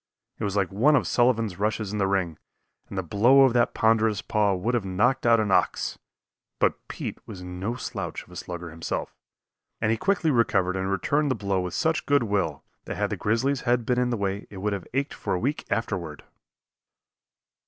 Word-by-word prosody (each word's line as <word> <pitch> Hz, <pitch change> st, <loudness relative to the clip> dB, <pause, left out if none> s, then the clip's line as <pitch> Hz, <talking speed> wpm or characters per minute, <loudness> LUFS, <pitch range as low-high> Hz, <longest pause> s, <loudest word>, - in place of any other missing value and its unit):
It -, -, -4 dB
was 100 Hz, -1 st, -2 dB
like 100 Hz, -3 st, +1 dB
one 130 Hz, +10 st, +4 dB
of -, -, +2 dB
Sullivan's 115 Hz, -6 st, +1 dB
rushes 105 Hz, -1 st, -1 dB
in 105 Hz, -, -3 dB
the 100 Hz, -, +2 dB
ring, 95 Hz, -5 st, -1 dB, 0.5 s
and 100 Hz, -, -7 dB
the 95 Hz, -, 0 dB
blow 115 Hz, -, +5 dB
of 135 Hz, -3 st, +5 dB
that 120 Hz, -1 st, +2 dB
ponderous 110 Hz, -2 st, +2 dB
paw 105 Hz, -2 st, +2 dB
would 105 Hz, +7 st, -1 dB
have 120 Hz, -4 st, +1 dB
knocked 120 Hz, +8 st, +1 dB
out 115 Hz, -1 st, +6 dB
an 105 Hz, -2 st, 0 dB
ox; -, -, +1 dB, 0.6 s
but -, -, 0 dB
Pete -, -, -5 dB
was 90 Hz, -2 st, -8 dB
no 90 Hz, +6 st, -4 dB
slouch 125 Hz, -, -5 dB
of -, -, -21 dB
a -, -, -12 dB
slugger 85 Hz, -1 st, -6 dB
himself, 80 Hz, 0 st, -4 dB, 0.6 s
and 110 Hz, -, +1 dB
he 115 Hz, -, +1 dB
quickly 185 Hz, -, +1 dB
recovered 95 Hz, -7 st, +2 dB
and 95 Hz, 0 st, -1 dB
returned 145 Hz, -, +1 dB
the 130 Hz, -, +1 dB
blow 100 Hz, -3 st, -1 dB
with 90 Hz, -1 st, -4 dB
such 160 Hz, +1 st, 0 dB
good 145 Hz, -3 st, +4 dB
will 95 Hz, -, -1 dB, 0.2 s
that -, -, -5 dB
had -, -, -1 dB
the -, -, 0 dB
grizzly's 125 Hz, +6 st, 0 dB
head 120 Hz, -1 st, +1 dB
been 125 Hz, +1 st, +1 dB
in 125 Hz, 0 st, +1 dB
the 120 Hz, -, -1 dB
way 100 Hz, 0 st, -2 dB
it 100 Hz, -, -10 dB
would 105 Hz, +2 st, -1 dB
have 100 Hz, -3 st, -5 dB
ached 140 Hz, +1 st, 0 dB
for -, -, -2 dB
a -, -, -1 dB
week 140 Hz, +8 st, -2 dB
afterward. 90 Hz, -8 st, -3 dB
105 Hz, 205 wpm, -26 LUFS, 95-125 Hz, 0.6 s, out